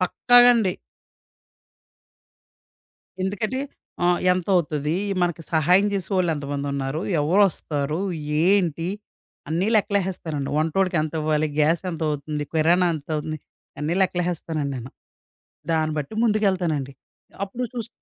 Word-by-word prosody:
పక్కాగండి. 240 +1 +5 2.5
ఎందుకంటే 215 +7 -2 0.4
ఆహ్, 175 0 +3
ఎంతవుతది, 165 -5 0 0.3
మనకి 170 -2 -1
సహాయం 180 +6 +4
జేసే 195 0 -3
వాళ్ళెంతమందున్నారు, 145 -4 -1 0.2
ఎవరొస్తారు, 155 -3 +1 0.5
ఏంటి, 175 -4 +2 0.6
అన్నీ 170 +5 0
లెక్కలెహేస్తానండి. 185 -8 -1
వంటోడికి 175 +3 +1
ఎంత 155 -1 -3
ఇవ్వాలి, 155 0 +1
గ్యాస్ 155 +2 +3
ఎంతవుతుంది, 150 -2 -3
కిరాణా 170 +3 +4
ఎంతవుతుంది, 155 +1 -4 0.4
అన్నీ 155 +3 -1
లెక్కలెహేస్తానండి 170 -5 -2
నేను. 125 +1 -7 0.8
దాన్ని 155 -1 +1
బట్టి 150 +8 -5
ముందుకెళ్తానండి. 185 - +1 0.5
అప్పుడు 235 +6 -5
చూస్ 235 -2 -4
165 Hz, 90 wpm, -23 LUFS, 150-190 Hz, 2.5 s, పక్కాగండి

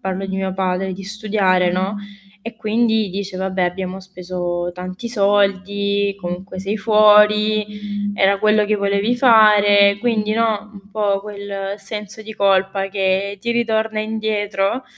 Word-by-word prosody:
parlo 190 0 -4
di 190 0 -4
mio 190 -1 -2
padre 190 0 -2
di 195 - -9
studiare, 195 -3 +1
no, 190 +3 -2 0.4
e 230 +2 -9
quindi 220 -2 0
dice: 195 0 -5
"Vabbè 185 -1 -1
abbiamo 185 +1 -4
speso 180 -2 -4
tanti 185 +6 -7
soldi, 200 -1 0
comunque 185 +1 -6
sei 200 +3 -3
fuori, 210 -1 +3
era 195 0 +2
quello 215 0 +3
che 210 0 0
volevi 200 +3 0
fare.", 205 -4 +5
quindi 215 -3 0
no, 220 -2 -1
un 200 0 -15
po' 200 -2 0
quel 200 -1 -6
senso 210 +1 -8
di 220 0 -9
colpa 195 -1 +1
che 195 0 -1
ti 235 +5 -3
ritorna 220 -2 0
indietro. 215 +1 -2
200 Hz, 140 wpm, -19 LUFS, 190-215 Hz, 0.4 s, fare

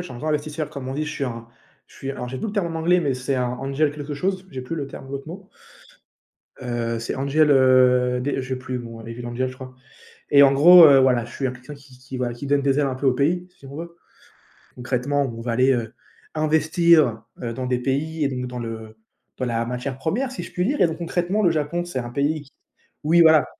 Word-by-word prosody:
je - - -3
suis 175 - -9
un 120 - -9
grand 155 +4 -4
investisseur, 150 0 -2
comme 135 -2 -7
on 130 - -4
dit. 155 +2 -2
Je 150 - -5
suis 140 - -3
un 115 -2 -6 0.4
je - - -20
suis 135 - -5
alors, 125 -2 -6
j'ai 130 - -5
plus - - -3
le 200 - -5
terme 175 -6 -1
en 160 - -2
anglais, 175 +2 +3
mais 140 -5 0
c'est 130 +2 -2
un 125 -1 0
angel 140 +2 0
quelque 145 0 -6
chose, 185 +4 -2
j'ai 130 -2 -6
plus 130 - -5
le 145 -4 -4
terme 135 - -10
de 135 - -10
l'autre 140 +2 -6
mot 190 +3 -10 1.1
heu, 120 -2 -2
c'est 115 - -4
angel, 145 +3 +2
heu, 125 -2 +4
dé 135 +1 -1
je 130 - -7
sais 130 - -2
plus, 130 0 -5
bon, 115 -1 -9
devil 115 +2 -8
angel, 125 +2 -2
je 130 - -9
crois 130 0 -11 0.6
et 140 - +7
en 140 -1 +7
gros, 170 +6 +8
heu, 140 -3 +7
voilà, 130 -3 +3
je 120 - -11
suis 135 - -4
un 130 - 0
quelqu'un 130 +4 -11
qui 140 -2 -18
qui 125 - -17
qui 130 0 -8
voilà, 125 -1 -2
qui 120 +4 -7
donne 145 0 +2
des 140 +1 +2
ailes 140 - +2
un 130 - -3
peu 135 - -5
au 130 - +4
pays, 170 +7 0
si 135 - -13
on 140 - -10
veut. 170 +2 -8 0.8
Concrètement, 130 +3 -1
on 115 -4 -5
va 120 0 -2
aller, 130 +3 +3
heu, 115 -3 -2 0.4
investir, 155 -5 +3 0.2
heu, 115 -2 -4
dans 130 +2 -4
des 125 -1 0
pays 150 +4 -1
et - - +3
donc 125 -2 -4
dans 125 0 -6
le 110 -1 -7 0.4
dans 130 - -2
la 115 -1 -1
matière 125 +2 -4
1re 210 - -1
si - - -6
je - - -10
puis 180 +1 -1
dire 290 +3 0
et 175 - +6
donc 160 - -5
concrètement 175 +4 -1
le 175 - +4
Japon 160 +3 -2
c'est 175 -7 -4
un 120 -1 -5
pays 145 +4 -1
qui 140 -1 -18 0.5
oui, 170 +3 +4
voilà 160 -3 +6
135 Hz, 260 wpm, -23 LUFS, 125-155 Hz, 1.1 s, gros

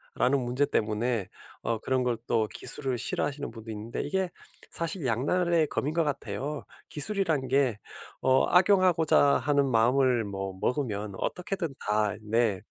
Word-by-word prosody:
라는 135 +2 +2
문제 125 +4 +1
때문에 110 0 -1 0.4
어 115 -1 -1
그런 130 +2 0
걸 120 -2 0
또 110 -2 +1
기술을 130 -4 -1
싫어하시는 145 +4 -1
분도 115 -1 -9
있는데 110 +2 -5
이게 190 +5 -1 0.4
사실 170 +1 -3
양날의 165 +8 +1
검인 145 - -2
것 165 - +3
같아요. 140 0 -4 0.2
기술이란 160 -5 +2
게 130 -6 +1 0.4
어 130 0 +4
악용하고자 180 -3 +4 0.2
하는 145 -1 +2
마음을 125 +1 +3
뭐 95 -2 -5
먹으면 105 -7 -2
어떻게든 180 -4 -3 0.2
다 105 -1 +1
네 110 -2 0
130 Hz, 300 characters per minute, -28 LUFS, 110-150 Hz, 0.4 s, 어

